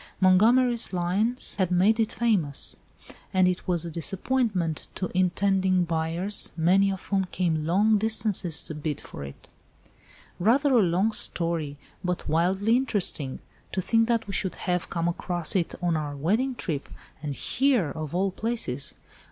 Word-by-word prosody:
Montgomery's 230 Hz, +6 st, +4 dB
lines 195 Hz, +8 st, -1 dB
had 185 Hz, -3 st, +1 dB
made 195 Hz, +5 st, +3 dB
it 220 Hz, -, +1 dB
famous. 195 Hz, -12 st, +1 dB, 0.6 s
And 185 Hz, -1 st, +4 dB
it 180 Hz, +1 st, -2 dB
was 175 Hz, -2 st, +1 dB
a 170 Hz, -, -6 dB
disappointment 185 Hz, -, 0 dB
to 185 Hz, -, -4 dB
intending 185 Hz, 0 st, +2 dB
buyers, 170 Hz, +4 st, 0 dB
many 190 Hz, +4 st, +3 dB
of 190 Hz, -1 st, -7 dB
whom 195 Hz, -1 st, 0 dB
came 165 Hz, -4 st, -2 dB
long 205 Hz, +5 st, +3 dB
distances 205 Hz, -6 st, +3 dB
to -, -, -6 dB
bid 150 Hz, -1 st, -4 dB
for -, -, -10 dB
it." 70 Hz, 0 st, -11 dB, 0.9 s
"Rather 265 Hz, +9 st, +3 dB
a 240 Hz, -, +5 dB
long 185 Hz, +4 st, +1 dB
story, 165 Hz, -8 st, -1 dB, 0.3 s
but 180 Hz, -1 st, -3 dB
wildly 190 Hz, +8 st, +1 dB
interesting. 195 Hz, -, -2 dB, 0.3 s
To -, -, -1 dB
think 225 Hz, +4 st, +2 dB
that 230 Hz, -1 st, 0 dB
we 200 Hz, -, -7 dB
should 190 Hz, 0 st, -2 dB
have 180 Hz, -1 st, -2 dB
come 170 Hz, 0 st, -2 dB
across 175 Hz, -1 st, -1 dB
it 175 Hz, -3 st, 0 dB
on 170 Hz, -2 st, +1 dB
our 150 Hz, -2 st, -3 dB
wedding 220 Hz, -, 0 dB
trip, 150 Hz, -10 st, -4 dB, 0.3 s
and 145 Hz, -2 st, -4 dB
here 250 Hz, -, +1 dB
of 155 Hz, +2 st, -6 dB
all 190 Hz, +1 st, +1 dB
places. 185 Hz, -, -3 dB
185 Hz, 150 wpm, -26 LUFS, 165-215 Hz, 0.9 s, a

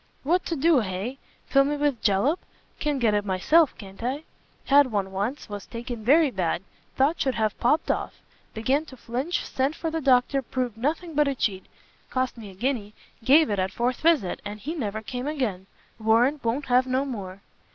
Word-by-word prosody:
"What 350 Hz, +6 st, +2 dB
to 335 Hz, -, -1 dB
do, 310 Hz, 0 st, +4 dB
hay? 210 Hz, +6 st, -4 dB, 0.3 s
fill 275 Hz, 0 st, +4 dB
me 290 Hz, +1 st, -1 dB
with 285 Hz, -5 st, 0 dB
jallop? 225 Hz, -, +2 dB, 0.4 s
can 295 Hz, -2 st, 0 dB
get 230 Hz, -5 st, +2 dB
it 205 Hz, 0 st, +1 dB
myself, 230 Hz, -, +3 dB
can't 195 Hz, 0 st, -11 dB
I? 265 Hz, +6 st, -2 dB, 0.4 s
Had 280 Hz, -2 st, +5 dB
one 195 Hz, -2 st, -1 dB
once; 205 Hz, +9 st, -3 dB
was 205 Hz, -1 st, -7 dB
taken 235 Hz, -1 st, -6 dB
very 290 Hz, +4 st, +5 dB
bad, 180 Hz, -3 st, -1 dB, 0.3 s
thought 285 Hz, +5 st, +2 dB
should 265 Hz, -2 st, +1 dB
have 215 Hz, -1 st, -1 dB
popt 295 Hz, +7 st, +2 dB
off; -, -, -3 dB, 0.4 s
began 260 Hz, +7 st, +1 dB
to 260 Hz, -, -13 dB
flinch, 255 Hz, +9 st, -2 dB
sent 270 Hz, +4 st, -1 dB
for 325 Hz, -1 st, -3 dB
the 325 Hz, 0 st, -2 dB
doctor, 265 Hz, 0 st, +3 dB
proved 250 Hz, -2 st, -3 dB
nothing 315 Hz, +7 st, -2 dB
but 295 Hz, 0 st, +3 dB
a 275 Hz, -, 0 dB
cheat! 195 Hz, -6 st, -2 dB, 0.4 s
cost 255 Hz, -1 st, -1 dB
me 220 Hz, -4 st, -9 dB
a 190 Hz, -, -13 dB
guinea, 215 Hz, -1 st, -2 dB, 0.3 s
gave 290 Hz, +1 st, +5 dB
it 200 Hz, -, 0 dB
at 185 Hz, 0 st, 0 dB
fourth 245 Hz, +1 st, -1 dB
visit, 310 Hz, -, +2 dB
and 205 Hz, +1 st, -7 dB
he 300 Hz, +8 st, -4 dB
never 220 Hz, -8 st, -3 dB
came 245 Hz, +6 st, -4 dB
again! 225 Hz, -11 st, -2 dB, 0.3 s
warrant 235 Hz, +6 st, +3 dB
won't 245 Hz, +5 st, -1 dB
have 255 Hz, 0 st, +3 dB
no 260 Hz, +2 st, +1 dB
more!" 200 Hz, -7 st, -6 dB
250 Hz, 195 wpm, -25 LUFS, 210-285 Hz, 0.4 s, Had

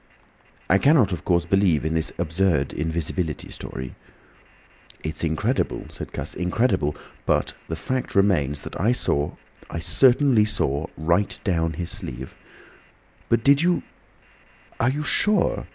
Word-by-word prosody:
I 95 Hz, -, +4 dB
cannot 140 Hz, -, +4 dB
of 80 Hz, -, -5 dB
course 85 Hz, -2 st, +2 dB
believe 90 Hz, -4 st, +2 dB
in 80 Hz, -, 0 dB
this 80 Hz, 0 st, +1 dB
absurd 85 Hz, -3 st, +1 dB
invisibility 80 Hz, 0 st, -2 dB
story—" 65 Hz, -1 st, -7 dB, 1.1 s
"It's 80 Hz, +1 st, -4 dB
incredible," 80 Hz, -2 st, -1 dB
said -, -, -8 dB
Cuss—"incredible. 90 Hz, -, -1 dB, 0.3 s
But -, -, +1 dB
the 80 Hz, -, -3 dB
fact 130 Hz, +10 st, -3 dB
remains 75 Hz, -8 st, +2 dB
that -, -, -6 dB
I 115 Hz, +6 st, +3 dB
saw—I 70 Hz, -, -3 dB
certainly 120 Hz, -, +4 dB
saw 75 Hz, -7 st, -1 dB
right 85 Hz, +5 st, +1 dB
down 80 Hz, -4 st, 0 dB
his 85 Hz, +2 st, -3 dB
sleeve—" 65 Hz, +2 st, -4 dB, 1.0 s
"But 115 Hz, -1 st, +2 dB
did 140 Hz, +2 st, +5 dB
you—are 170 Hz, -7 st, -4 dB
you 145 Hz, +3 st, -2 dB
sure? 210 Hz, +8 st, +2 dB
85 Hz, 120 wpm, -24 LUFS, 80-110 Hz, 1.1 s, did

